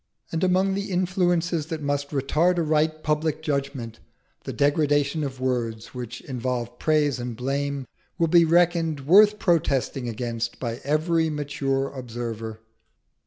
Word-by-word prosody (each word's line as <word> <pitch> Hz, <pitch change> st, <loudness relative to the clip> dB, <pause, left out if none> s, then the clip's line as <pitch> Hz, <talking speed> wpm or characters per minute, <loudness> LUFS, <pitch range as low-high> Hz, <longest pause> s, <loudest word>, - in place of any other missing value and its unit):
And 165 Hz, +1 st, -1 dB
among 185 Hz, +1 st, +3 dB
the 200 Hz, +1 st, -3 dB
influences 175 Hz, -3 st, 0 dB
that 160 Hz, -2 st, -4 dB
must 145 Hz, 0 st, -1 dB
retard 150 Hz, +6 st, +1 dB
a 170 Hz, -, +2 dB
right 155 Hz, 0 st, +1 dB
public 155 Hz, +1 st, 0 dB
judgment, 140 Hz, -6 st, -3 dB, 0.5 s
the -, -, -3 dB
degradation 145 Hz, +1 st, +1 dB
of 135 Hz, -2 st, -5 dB
words 120 Hz, -4 st, -2 dB
which 125 Hz, -1 st, -6 dB
involve 125 Hz, -2 st, -4 dB
praise 150 Hz, -4 st, +2 dB
and 120 Hz, -1 st, -4 dB
blame 140 Hz, +2 st, -2 dB, 0.3 s
will 170 Hz, -, +3 dB
be 170 Hz, +1 st, +5 dB
reckoned 165 Hz, -2 st, +2 dB
worth 205 Hz, +8 st, +6 dB
protesting 140 Hz, -, 0 dB
against 115 Hz, 0 st, -4 dB
by 120 Hz, -1 st, -4 dB
every 160 Hz, +3 st, +1 dB
mature 140 Hz, -2 st, -1 dB
observer. 115 Hz, -3 st, -6 dB
145 Hz, 135 wpm, -25 LUFS, 125-165 Hz, 0.5 s, worth